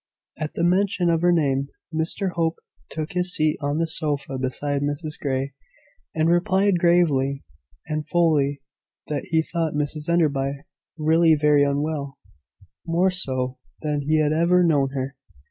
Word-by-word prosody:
At 155 -1 -4
the 170 - -2
mention 180 -1 +2
of 165 -1 +1
her 175 0 +4
name 140 -5 +1 0.3
Mr 165 +4 -2
Hope 165 -1 0 0.3
took 155 -1 -5
his 180 0 0
seat 155 0 +1
on 145 +1 -1
the 165 - +1
sofa 150 -4 -2
beside 140 +2 -1
Mrs 145 +2 -3
Grey, 135 0 -2 0.6
and 160 0 +2
replied 190 +2 +2
gravely 150 -6 +2 0.4
and 155 -1 -4
fully 145 -5 +2 0.5
that 145 -2 -2
he 160 0 +1
thought 165 -2 -2
Mrs 150 +1 -2
Enderby 140 -4 +1 0.3
really 160 +1 +4
very 150 -1 +3
unwell 145 0 -2 0.7
more 175 +3 +2
so 130 -7 -1 0.2
than 150 -1 -1
he 155 +2 +1
had 150 0 +2
ever 175 +3 +3
known 145 -5 +3
her. 135 +1 -3
155 Hz, 145 wpm, -23 LUFS, 140-170 Hz, 0.7 s, her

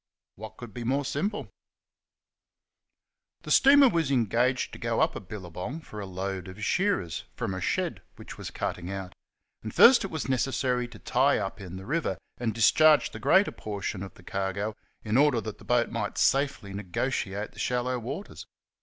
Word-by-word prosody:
What 110 +2 -10
could 120 -4 -9
be 120 - -5
more 135 +4 0
simple? 205 - -2 1.9
The - - -6
steamer 280 0 +7
was 165 - +1
engaged 125 0 +1
to - - -8
go - - -1
up - - +2
a - - -3
billabong 95 - -7
for 105 -8 -9
a 100 - -5
load 95 0 -4
of 100 +4 -6
shearers 180 - 0
from 95 - -3
a 95 - -4
shed - - -1
which - - -10
was - - -7
cutting 90 +1 -4
out; 95 -2 -5 0.5
and 110 - -6
first 240 - +7
it 195 - -3
was 160 -4 -4
necessary 130 -1 0
to 120 -2 -13
tie 135 +6 +2
up 100 +1 -4
in 90 -2 -8
the 95 - -9
river 150 - -1 0.2
and 120 -2 0
discharge 150 +8 +5
the - - -8
greater 195 +2 +4
portion 100 -2 -5
of 100 - -8
the 90 - -17
cargo 100 +3 -2 0.3
in 110 +2 +1
order 145 -4 +4
that 110 -2 -7
the - - -14
boat 120 -1 +2
might 105 -3 -3
safely 135 -8 +1
negotiate 100 +1 -2
the 105 - -14
shallow 125 +2 0
waters. 140 - -7
115 Hz, 180 wpm, -28 LUFS, 100-135 Hz, 1.9 s, steamer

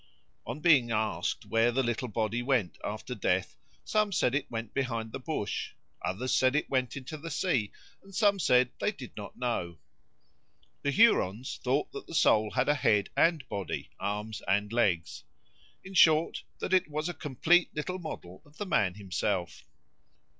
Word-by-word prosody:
On 125 +6 -5
being 145 -9 +5
asked 110 -1 -1
where 115 +1 +2
the 135 +2 +1
little 120 +1 -1
body 110 +1 -1
went 120 -8 0
after - - -4
death, - - 0 0.3
some 215 -1 +1
said 125 -9 +2
it 145 +1 -1
went 115 -2 -5
behind 115 -5 -2
the - - -5
bush, 130 -6 -3 0.3
others 100 +9 -1
said 130 +2 +3
it 150 - +1
went 130 0 0
into 140 +3 -7
the 165 +3 -7
sea, 145 - 0 0.3
and 195 -1 -14
some 205 -1 +3
said 125 -6 +4
they - - +1
did 130 - -11
not 105 - -8
know. 90 -9 -2 1.0
The 140 - 0
Hurons 130 - +3
thought 135 +4 0
that - - -8
the 165 - -7
soul 110 -6 +4
had 125 +3 0
a 145 - +5
head 105 -8 +2
and 160 -6 +2
body, 100 -2 -4
arms 105 +2 -3
and 105 +2 +1
legs; 95 -9 0 0.6
in 190 - -10
short, 160 -3 +4
that 185 - -3
it 185 -4 +3
was 155 +2 -2
a 175 - -3
complete 165 +5 +2
little 180 +5 -3
model 95 - -8
of 145 +2 -22
the 205 - -3
man 100 - +1
himself. 95 -2 -2
125 Hz, 170 wpm, -30 LUFS, 110-155 Hz, 1.0 s, being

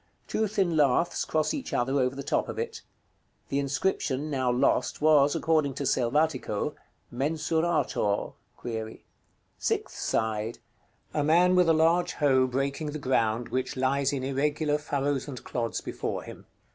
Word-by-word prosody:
Two 220 - 0
thin 190 -5 0
laths 150 +3 +2
cross 155 -1 0
each 275 -3 -5
other 135 +3 +1
over 130 0 +1
the 140 - -5
top - - 0
of - - -5
it. - - -4 0.7
The 140 - 0
inscription, 140 0 -1
now 130 -3 +1
lost, 125 - +1
was, 145 -2 +4
according 155 -4 +1
to 140 - -3
Selvatico, 130 -2 0 0.4
"MENSURATOR"? 150 -5 0 1.3
Sixth - - -1
side. 110 0 -1 0.6
A 150 - +1
man, 175 +4 +4
with 180 -2 +4
a - - +6
large 165 +3 +3
hoe, 130 -3 +3
breaking 140 +3 -2
the - - -3
ground, 120 -4 0
which 130 +1 -2
lies 135 +1 +1
in 135 -2 -3
irregular 145 +2 0
furrows 140 -2 -1
and 130 -4 -7
clods 115 -2 -3
before - - -4
him. - - -11
140 Hz, 145 wpm, -28 LUFS, 130-155 Hz, 1.3 s, a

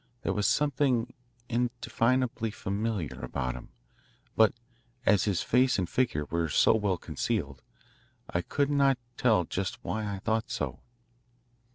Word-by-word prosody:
There - - 0
was 105 -1 +1
something 130 -4 +1 0.3
indefinably 120 0 0
familiar 100 - -3
about 65 0 -2
him, 60 - -10 0.7
but 110 -2 +6 0.5
as 105 -3 +4
his 100 -5 0
face 125 +1 +3
and 90 -3 0
figure 80 - 0
were 85 +2 -1
so - - +5
well 105 -4 +1
concealed, 70 -4 -3 0.7
I 85 - -1
could 140 +9 0
not 140 -2 +4 0.2
tell 110 -7 +3
just 95 +2 -3
why 110 -2 -2
I 100 - -3
thought 110 +3 -1
so. - - -3
110 Hz, 135 wpm, -29 LUFS, 90-125 Hz, 0.7 s, but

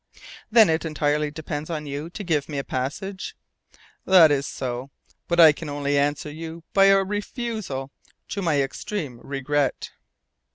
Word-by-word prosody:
"Then 225 -2 +7
it 160 0 +1
entirely 150 -1 0
depends 150 0 -5
on 155 -3 -3
you 145 +3 -5
to 205 +4 -7
give 155 -6 0
me 145 - -4
a 140 - -1
passage?" 185 +11 -4 0.7
"That 175 -5 +7
is 140 -1 +1
so, 125 +1 -4 0.4
but 170 0 0
I 160 -2 +10
can 150 +1 -7
only 145 0 -1
answer 145 +1 0
you 165 +2 -8
by 195 0 +6
a 195 0 +6
refusal 205 - -4 0.4
to 200 - -3
my 150 -6 +2
extreme 135 - -5
regret." 140 +1 -1
150 Hz, 155 wpm, -24 LUFS, 140-180 Hz, 0.7 s, I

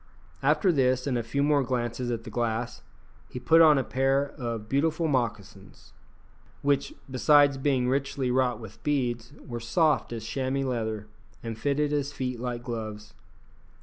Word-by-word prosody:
After 190 - +3
this, 130 -4 +2
and 135 -3 0
a 120 - +1
few 140 +5 -1
more 145 -1 +3
glances 120 -1 -2
at 115 -2 -3
the 110 - -9
glass, 120 +1 -2 0.5
he 125 - -6
put 160 +7 +5
on 155 -3 +7
a 135 - +1
pair 135 +2 +1
of 115 -5 -5
beautiful 160 +5 +1
moccasins, 105 -7 -4 0.7
which, 145 - +1 0.2
besides 140 +1 +4
being 130 -3 +1
richly 135 -1 0
wrought 125 -2 +1
with 100 - -11
beads, 120 -5 -1
were 120 -1 -5
soft 145 +6 +1
as 115 -2 -5
chamois 135 +2 -1
leather 110 -4 -2 0.4
and 115 -1 -4
fitted 145 +5 0
his 145 -1 -1
feet 125 -4 -4
like 120 -1 -4
gloves. 110 -3 -6
125 Hz, 155 wpm, -27 LUFS, 115-140 Hz, 0.7 s, on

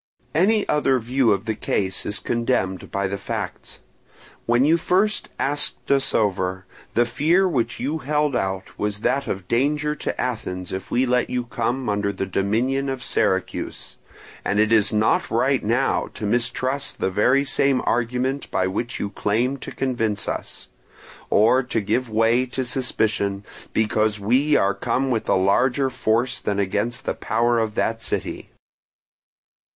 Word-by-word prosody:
"Any 205 +7 +3
other 140 -3 +2
view 125 0 +1
of 100 +1 0
the 110 - 0
case 95 -2 -2
is 105 - 0
condemned 115 -6 -1
by 100 0 -1
the 100 +1 -3
facts. - - -5 0.7
When 120 +3 +4
you 160 +3 +5
first 190 +5 +1
asked 145 0 -2
us 135 -1 +2
over, 95 -3 0 0.3
the 120 - +4
fear 170 +10 +2
which 120 -8 -1
you 145 +6 -2
held 150 -1 0
out 95 -2 -3
was 105 0 -2
that 140 +3 0
of 95 -1 -4
danger 150 +6 +1
to - - -4
Athens 90 -8 -3
if 95 0 -5
we 125 +2 +2
let 125 0 +1
you 125 -1 -1
come 125 +2 -2
under 100 -1 0
the 95 - -3
dominion 115 +9 0
of 130 -1 -4
Syracuse; 95 0 -1 0.5
and 100 - 0
it 110 +1 +3
is 110 -3 +4
not 110 0 +2
right - - +1
now - - +1
to - - -4
mistrust 125 +5 -1
the 95 - 0
very 125 +8 +3
same 135 -1 +2
argument 125 +3 -1
by 95 - 0
which 115 +6 -3
you 100 - -3
claimed 120 +7 0
to - - -6
convince 115 -6 -1
us, - - -5 0.6
or 115 +5 +4
to 125 -3 -2
give 120 +4 -1
way 115 +3 +2
to 130 +1 -3
suspicion 110 -6 -1 0.3
because 110 -1 +1
we 130 +9 +2
are 100 +1 +3
come 135 +5 -1
with 115 -3 -1
a - - +4
larger 130 +8 +2
force 120 0 0
against 105 +6 -1
the - - 0
power 120 +1 +1
of 110 -2 -1
that 115 0 0
city. - - -3
120 Hz, 155 wpm, -23 LUFS, 105-135 Hz, 0.7 s, you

